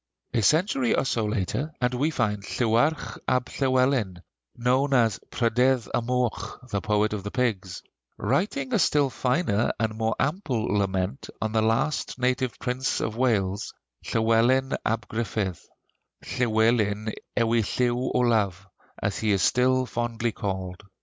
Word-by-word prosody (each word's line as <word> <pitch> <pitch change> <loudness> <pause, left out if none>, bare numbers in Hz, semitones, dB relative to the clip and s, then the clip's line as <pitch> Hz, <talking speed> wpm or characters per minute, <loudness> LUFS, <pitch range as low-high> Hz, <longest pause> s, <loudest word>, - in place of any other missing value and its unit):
A 115 - +2
century 135 - +3
or - - +1
so 115 -4 0
later, 110 - -2
and 125 0 +1
we 140 +5 +1
find 110 -9 -1
Llywarch 120 +3 0
ab 125 -1 +2
Llywelyn 130 -9 +1 0.3
(known 130 +3 +2
as 115 -5 +3
"Prydydd 125 0 +2
y - - +2
Moch," 120 -3 -2
the 100 - -1
Poet 105 0 +1
of 105 - -3
the 100 - -4
Pigs) 100 -7 -2 0.3
writing 210 - -1
a 225 - +3
still 145 -5 +3
finer 125 - +1
and 110 -1 0
more 110 0 0
ample 135 - -1
lament 95 -7 -1
on 110 - -2
the 110 0 +2
last 115 +8 0
native 125 0 0
prince 125 +1 -1
of 110 - -2
Wales, 105 -5 0 0.3
Llywelyn 115 +4 +2
ab 115 +1 -1
Gruffydd, 105 -5 -2 0.6
"Llywelyn 110 -2 +1 0.2
ewi 115 -1 +3
Llyw 125 +3 0
Olaf," 105 -6 +1 0.3
as 100 -1 -2
he 110 - 0
is 100 -3 +2
still 130 +1 +3
fondly 120 -1 -2
called. 95 -3 -4
115 Hz, 140 wpm, -26 LUFS, 105-130 Hz, 0.6 s, century